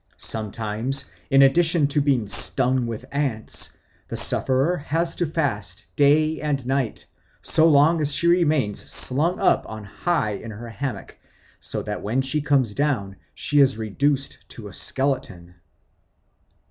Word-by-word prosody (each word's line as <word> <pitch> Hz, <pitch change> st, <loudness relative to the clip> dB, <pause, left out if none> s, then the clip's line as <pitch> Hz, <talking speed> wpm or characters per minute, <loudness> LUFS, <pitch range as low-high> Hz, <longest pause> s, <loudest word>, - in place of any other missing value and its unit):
Sometimes, 110 Hz, +5 st, -3 dB, 0.2 s
in 135 Hz, 0 st, +6 dB
addition 165 Hz, +2 st, +3 dB
to 145 Hz, +1 st, +1 dB
being 135 Hz, -7 st, +1 dB
stung 125 Hz, +4 st, +2 dB
with 115 Hz, +1 st, -6 dB
ants, 135 Hz, -6 st, -1 dB, 0.4 s
the -, -, -5 dB
sufferer 135 Hz, +7 st, +1 dB
has 165 Hz, +3 st, -1 dB
to 175 Hz, -, 0 dB
fast 105 Hz, -, -2 dB
day 155 Hz, +4 st, +3 dB
and 145 Hz, -4 st, -2 dB
night 130 Hz, -3 st, -2 dB, 0.4 s
so 160 Hz, +1 st, +4 dB
long 155 Hz, +2 st, +4 dB
as 150 Hz, -1 st, 0 dB
she 155 Hz, -, -2 dB
remains 155 Hz, -, +2 dB
slung 155 Hz, +8 st, +1 dB
up -, -, +3 dB
on 110 Hz, -1 st, -7 dB
high 110 Hz, -, -1 dB
in 105 Hz, +3 st, -6 dB
her 115 Hz, +2 st, -8 dB
hammock, 130 Hz, +3 st, -6 dB, 0.4 s
so -, -, -4 dB
that -, -, -4 dB
when 120 Hz, +6 st, 0 dB
she 150 Hz, +3 st, -1 dB
comes 135 Hz, -7 st, +1 dB
down 120 Hz, -8 st, -1 dB, 0.2 s
she 145 Hz, -, +1 dB
is 135 Hz, -4 st, +4 dB
reduced 135 Hz, +6 st, -1 dB
to 110 Hz, -3 st, -10 dB
a 100 Hz, -, -11 dB
skeleton. 110 Hz, -11 st, -2 dB
135 Hz, 145 wpm, -23 LUFS, 110-150 Hz, 0.4 s, in